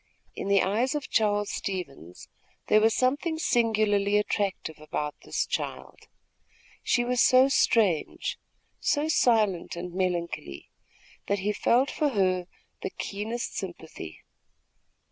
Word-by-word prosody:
In - - -5
the 200 -1 +4
eyes 230 +9 0
of 295 - -4
Charles 205 -2 +2
Stevens, 140 - -6 0.4
there 215 - +6
was 220 0 +3
something 285 +6 +1
singularly 215 -7 +2
attractive 195 -6 -2
about 150 -1 -3
this - - -2
child. - - -5 0.7
She 240 - +2
was 245 0 +1
so 255 +1 +6
strange, 215 - +1 0.4
so 295 0 +1
silent 220 - +2
and 175 0 -6
melancholy, 175 - -3 0.6
that 200 - +1
he 205 +2 -1
felt 250 +6 +2
for 300 -2 +1
her 185 -6 +1 0.3
the - - -3
keenest 220 +4 -4
sympathy. 160 - -7
205 Hz, 120 wpm, -27 LUFS, 180-240 Hz, 0.7 s, there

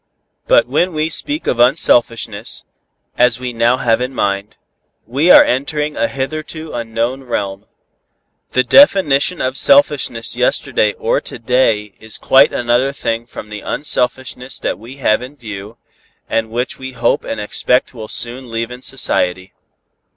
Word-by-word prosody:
But - - +5
when 180 0 0
we 155 +1 -1
speak 295 - -2
of 120 - -1
unselfishness, 120 -4 +1 0.6
as 125 -1 +3
we 125 -1 -5
now 120 +2 +2
have 120 -2 +1
it - - +1
in 130 +1 -9
mind, 100 0 -2 0.5
we 140 +9 0
are - - +9
entering 150 +4 -2
a 115 - 0
hitherto 155 +3 -5
unknown 115 +2 -3
realm. 100 -5 -4 0.9
The 130 - +3
definition 180 - +4
of 130 +1 0
selfishness 285 +1 +3
yesterday - - +1
or 475 +1 -1
to - - -8
day 115 -4 +1
is 110 0 -2
quite 135 +2 +4
another 120 +3 +1
thing 115 -4 -3
from 105 - -10
the 105 0 -7
unselfishness 130 -2 -1
that - - -2
we 120 +5 -11
have 120 -5 +1
in 130 +4 -9
view, 105 -2 -9 0.5
and 115 -1 -1
which 120 +3 -3
we 130 0 -7
hope - - 0
and 110 - -5
expect 125 +5 0
will 110 -3 -8
soon 120 +3 -2
leaven 115 +2 -4
society. 95 -8 -1
125 Hz, 150 wpm, -16 LUFS, 115-140 Hz, 0.9 s, are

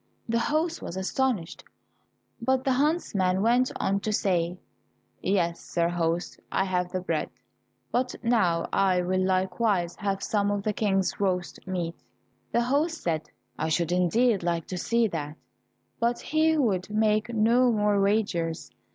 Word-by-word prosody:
The 230 0 +1
host 320 +6 0
was 170 - -6
astonished, 195 -2 -1 0.8
but 260 +2 +1
the 270 - +1
huntsman 210 - +1
went 245 +3 +3
on 195 +1 +1
to 215 - -2
say, 180 -4 0 0.6
"Yes, 170 -3 +1
sir 170 -1 0
host, 170 0 -1
I - - +2
have 180 -1 -1
the 185 - -2
bread, 185 - -2 0.6
but 250 0 0
now 185 -8 +2
I 185 -2 +3
will 185 +1 +1
likewise 185 -1 +1
have 195 -2 -2
some 205 -1 +1
of 205 -1 -1
the 215 - 0
King's 195 -4 0
roast 185 -3 -1
meat." 175 -3 -3 0.5
The 235 - +2
host 295 +7 0
said, 155 -3 -1 0.3
"I 160 - 0
should 170 +1 0
indeed 195 +5 +2
like 170 -2 -1
to 185 - -3
see 235 +4 +2
that," 150 -3 -4 0.6
but 235 +1 +1
he 315 +1 +2
would 205 -10 +1
make 215 +1 +1
no 235 +3 +4
more 210 -2 +2
wagers. 195 -6 0
195 Hz, 150 wpm, -27 LUFS, 180-235 Hz, 0.8 s, no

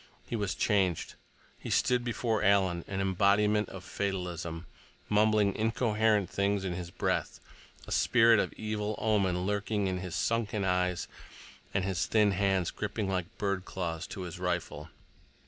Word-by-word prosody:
He - - -4
was 105 -4 -1
changed. 95 -6 +1 0.5
He - - -7
stood 125 -1 +2
before 115 -2 -1
Alan 95 -4 +3
an 95 -1 -2
embodiment 100 +3 +2
of 95 -1 -9
fatalism, 90 -4 -4 0.4
mumbling 105 -1 +3
incoherent 110 -2 +2
things 100 +1 0
in 90 - -2
his 85 -1 -5
breath, - - -2 0.5
a - - -10
spirit 115 -2 +5
of - - 0
evil 105 0 -3
omen 95 -5 +1
lurking 105 +1 -1
in 95 -1 -1
his 90 -2 -5
sunken 105 0 0
eyes, 90 -1 0 0.6
and 95 - 0
his 95 -4 -1
thin 105 -2 +4
hands 95 -2 +1
gripping 105 0 -3
like 95 +1 -3
bird 100 -3 -1
claws 85 -4 -4
to 95 - -7
his 90 -3 -6
rifle. - - -3
100 Hz, 145 wpm, -30 LUFS, 90-105 Hz, 0.6 s, spirit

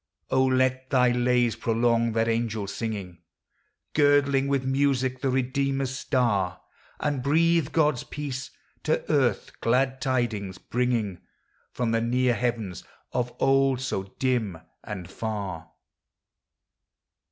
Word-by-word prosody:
O, 130 0 +4
let 130 0 +1
thy 125 -2 +4
lays 120 -1 +2
prolong 115 0 +1
that 115 0 +1
angel 115 -2 -1
singing, 100 -4 -5 0.7
Girdling 145 -2 +3
with 140 -1 0
music 130 -1 +1
the 135 - +1
Redeemer's 135 +1 0
star, 100 -10 0 0.4
And 145 -3 -1
breathe 160 +2 +2
God's 150 -5 +2
peace, 135 -3 -5 0.3
to 155 - 0
earth 130 -9 +1
"glad 130 +2 +1
tidings" 110 -8 -1
bringing 115 -6 -1 0.5
From 120 -2 -1
the 115 0 +2
near 125 +1 +2
heavens, 115 -6 -2 0.3
of 125 0 -1
old 135 -1 +3
so 95 -7 -4
dim 120 -9 0 0.3
and 95 -4 -6
far 95 -5 -5
125 Hz, 115 wpm, -26 LUFS, 115-135 Hz, 0.7 s, O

